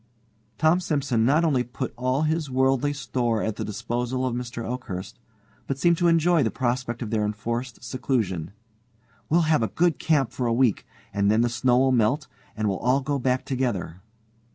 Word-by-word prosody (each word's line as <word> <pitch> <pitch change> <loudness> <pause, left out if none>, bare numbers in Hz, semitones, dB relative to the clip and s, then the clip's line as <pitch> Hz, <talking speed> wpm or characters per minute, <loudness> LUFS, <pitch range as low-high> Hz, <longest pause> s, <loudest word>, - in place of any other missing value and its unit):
Tom 160 +3 +4
Simson 140 -9 0
not 150 +6 +3
only 135 -6 +2
put 125 0 -5
all 130 +4 0
his 155 -1 0
worldly 130 +2 +2
store 125 -5 -1
at 110 -1 -2
the - - -3
disposal 120 +4 -2
of 125 - -1
Mr. 120 -1 -5
Oakhurst, 110 -7 -6 0.5
but 135 - -2
seemed 170 +3 +3
to 175 - +3
enjoy 165 0 +4
the 115 - +2
prospect 120 -1 -2
of 110 - -6
their 110 -2 +1
enforced 115 +4 -3
seclusion. 115 - -2 0.8
"We'll 170 +3 +4
have 155 -4 +2
a 110 - +1
good 170 - +1
camp 145 -6 +1
for 125 - -2
a 115 - +1
week, 120 -3 +1 0.3
and 100 0 +2
then 110 +2 +4
the 120 - +2
snow'll 125 +2 +2
melt, 130 +5 +2 0.3
and 110 0 0
we'll 95 -2 -1
all 125 +4 +2
go 140 +1 -1
back 130 0 0
together." 105 - -2
125 Hz, 180 wpm, -25 LUFS, 115-140 Hz, 0.8 s, Tom